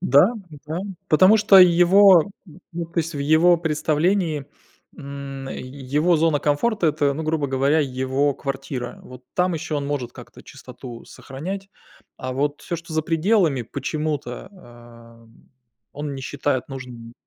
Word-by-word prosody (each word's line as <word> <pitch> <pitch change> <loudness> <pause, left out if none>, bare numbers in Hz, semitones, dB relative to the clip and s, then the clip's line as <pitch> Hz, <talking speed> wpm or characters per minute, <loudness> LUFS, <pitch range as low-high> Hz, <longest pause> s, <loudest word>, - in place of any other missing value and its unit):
Да-да, 165 - +1 0.3
потому 185 +7 +6
что 210 -2 +6
его, 180 +1 +7 0.2
н, 165 +2 -16
ну 170 0 -4
то 170 +1 -5
есть, 165 0 -5
в - - -4
его 160 +5 +4
представлении, 160 0 0 0.5
м, 140 -2 -8
его 140 +6 -1
зона 160 -2 +2
комфорта- 175 +8 0
это, 145 -1 +1
грубо 155 -1 -1
говоря, 135 +4 +2
его 130 +1 0
квартира. 135 -2 -5
Вот 125 0 -13
там 180 -1 +1
ещё 155 -1 -3
он 140 - -3
может 135 -4 -3
как-то - - -13
чистоту 120 -3 -11
сохранять, 190 +9 -7 0.5
а 130 0 -5
вот 145 +2 -2
всё, 170 - -4
что 165 0 -11
за 155 0 0
пределами, 165 - +1
почему-то, 145 - -4
а, 120 - -16 0.7
он 145 0 -5
не 135 - -7
считает 140 -1 -2
нужным. 125 -3 -9
150 Hz, 140 wpm, -22 LUFS, 135-170 Hz, 0.7 s, его